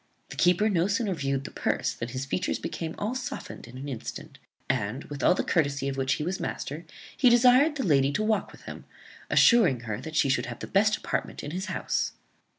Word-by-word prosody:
The - - -8
keeper 180 +5 +3
no 180 -4 +2
sooner 205 -1 0
viewed 135 -4 -2
the - - -8
purse - - -1
than 115 - -5
his 130 +2 -4
features 160 +7 -1
became 160 -1 -5
all 210 +4 -2
softened 250 - -6
in 125 +2 -11
an 135 +2 -6
instant; 125 -5 -7 0.3
and, 110 +7 -1
with 145 -1 -7
all - - +5
the - - -1
courtesy 140 -4 0
of 135 - -2
which 135 0 +1
he - - -3
was 180 +4 -2
master, 155 +5 -5 0.3
he 255 - +5
desired 250 +5 +5
the 270 - -2
lady 140 -5 +3
to 215 - 0
walk 215 0 0
with - - -16
him, - - -9 0.4
assuring 190 - +5
her 110 -1 -4
that 160 +3 -7
she 160 -3 +3
should 135 -2 +1
have 120 -1 -6
the - - -6
best 210 +2 +2
apartment - - -3
in 145 - -5
his 185 +4 -4
house. - - -1
160 Hz, 220 wpm, -27 LUFS, 135-210 Hz, 0.4 s, all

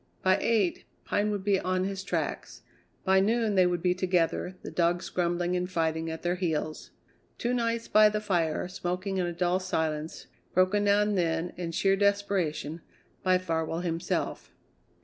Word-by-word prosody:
By 190 +1 +4
eight 215 -6 +1 0.2
Pine 205 +1 +1
would 205 -2 -2
be 200 -1 +2
on 185 0 0
his 195 0 -3
tracks; 195 - -3 0.4
by 190 0 +4
noon 220 +2 +2
they 185 -2 +5
would 175 -1 -1
be 180 -1 +3
together, 180 0 0
the - - -6
dogs 175 0 +1
grumbling 175 0 0
and 180 0 -1
fighting 160 -2 -1
at 160 0 -6
their 175 0 +1
heels. 160 -4 -2 0.5
Two 240 +1 -1
nights 230 -1 -1
by 215 0 +6
the 210 0 -1
fire, 175 -6 0
smoking 185 +1 -3
in 180 -1 0
a - - -2
dull 175 +1 +1
silence, 160 -4 -2 0.3
broken 190 +3 +3
now 205 0 +4
and 210 0 0
then, 165 0 -1
in 175 -2 -4
sheer 195 +3 +2
desperation, 195 -6 0 0.4
by 185 -1 +3
Farwell 165 -2 -2
himself. 170 -1 -2
185 Hz, 170 wpm, -28 LUFS, 170-200 Hz, 0.5 s, by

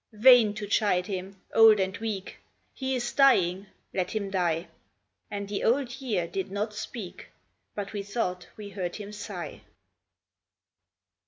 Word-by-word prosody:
Vain 225 -1 +7
to 210 -1 -4
chide 200 -3 +2
him; 190 -1 -5
old 220 -2 +8
and 190 +1 0
weak, 210 -4 -4 0.3
He 265 -1 -2
is 240 -1 -2
dying; 195 -9 +4 0.3
let 185 -2 -1
him 200 -3 -3
die." 175 -2 0 0.6
And 200 -1 -4
the 200 0 -3
Old 255 +1 +1
Year 210 -10 0
did 190 +2 -3
not 210 +2 -2
speak, 210 -2 -7 0.5
But 205 0 -5
we 205 - -2
thought 195 -3 -3
we 210 -1 -7
heard 185 -3 -4
him 205 -1 -7
sigh. 205 0 -7
205 Hz, 145 wpm, -28 LUFS, 190-225 Hz, 0.6 s, old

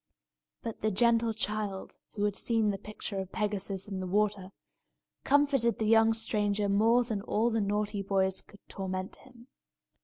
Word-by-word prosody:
But 230 -2 -5
the 215 - +1
gentle 230 +2 +3
child, 210 -3 -3 0.2
who 205 - -2
had 205 -1 +1
seen 225 -3 +1
the 195 - -5
picture 210 -1 -5
of 190 -1 -5
Pegasus 200 -2 -2
in 195 -2 -4
the 185 - -4
water, 200 -1 0 0.7
comforted 275 -5 +3
the 220 - -1
young 225 +1 +5
stranger 210 -2 0
more 225 +5 +4
than 220 -4 -3
all 225 +3 0
the 225 -1 +1
naughty 205 0 -1
boys 190 -1 0
could 205 - -20
torment 185 -1 -5
him. 245 -3 -17
210 Hz, 160 wpm, -30 LUFS, 195-225 Hz, 0.7 s, young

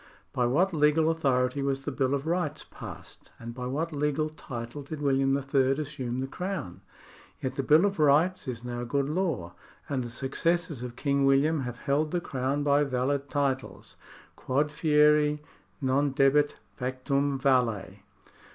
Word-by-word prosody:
By 125 -1 +1
what 175 +9 +2
legal 155 +1 +3
authority 135 -4 +1
was 135 0 -1
the - - -2
Bill 135 0 +1
of 140 +1 -4
Rights 170 -2 -1
passed, - - -10
and 115 0 -8
by 125 0 -5
what 155 +6 -2
legal 150 +1 0
title 125 -3 -7
did 145 +2 -7
William 135 -1 +2
III. 135 -1 +2
assume 135 -4 -4
the 135 - -2
Crown? 180 - -5 0.6
Yet 130 -1 -3
the 135 - 0
Bill 155 +7 +5
of 200 -3 -1
Rights 155 +4 +3
is 120 -2 -5
now 120 0 -4
good 140 +3 0
law, 150 - -2 0.3
and 135 -3 -1
the 120 - -6
successors 140 +4 -1
of 125 -1 -6
King 140 +1 +1
William 145 +4 +3
have 125 -3 -4
held 150 +4 0
the 175 - 0
Crown 135 -2 -2
by 145 0 +3
valid 140 +1 -1
titles. 140 -2 -2 0.4
Quod 145 +3 0
fieri 150 -1 +3 0.4
non 135 +1 +1
debet, 145 +2 +3 0.2
factum 135 +2 -1
valet. 115 -8 +1
140 Hz, 160 wpm, -28 LUFS, 130-150 Hz, 0.6 s, Bill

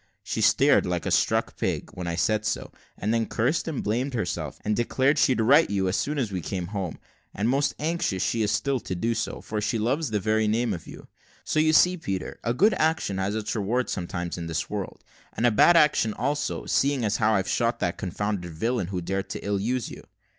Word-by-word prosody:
She - - -3
stared - - +4
like - - -2
a - - -1
stuck - - +1
pig, - - -2
when 90 -1 -5
I 85 - -1
said 110 +5 +1
so, 110 - -2 0.3
and 105 +3 -1
then 115 -1 +1
cursed 125 +11 0
and 155 -5 -3
blamed 125 +6 -1
herself, 85 - -3
and 105 0 +1
declared 130 +5 +2
she'd 130 -4 +3
right 140 +9 +5
you 95 -2 0
as 90 - 0
soon 150 +1 -1
as 120 -7 -1
we 95 -2 -3
came 90 +1 -4
home; 95 -5 -3 0.4
and 105 +3 0
most 140 +3 +1
anxious 150 - -1
she 115 +5 0
is 105 -1 +1
still 135 +6 0
to 95 - -5
do 115 +6 0
so, - - -3
for 105 -1 -4
she 110 +2 0
loves 130 +7 0
the 105 -1 0
very 110 +2 +1
name 115 +1 +1
of 85 - -7
you; - - -11 0.4
so 155 - 0
you 155 0 +4
see, 180 +3 +5
Peter, 95 - -4
a 115 - 0
good 200 - +4
action 155 -11 +1
has 100 +2 -1
its 110 +1 -3
reward 115 +4 0
sometimes 85 -1 -4
in 85 - -5
this 80 -1 -3
world, 105 -2 -5 0.3
and 120 - -1
a 120 - +5
bad 170 +11 +6
action 150 -8 +3
also, 145 +1 -2
seeing 135 -3 +1
as 105 - +1
how 110 -1 +3
I've 95 -2 0
shot 120 0 0
that 85 - -1
confounded 95 -2 -3
villain 110 +3 -1
who 90 -1 -3
dared 95 +3 -3
to - - -6
ill 100 -1 0
use 120 +3 -2
you. - - -10
110 Hz, 225 wpm, -26 LUFS, 95-130 Hz, 0.4 s, bad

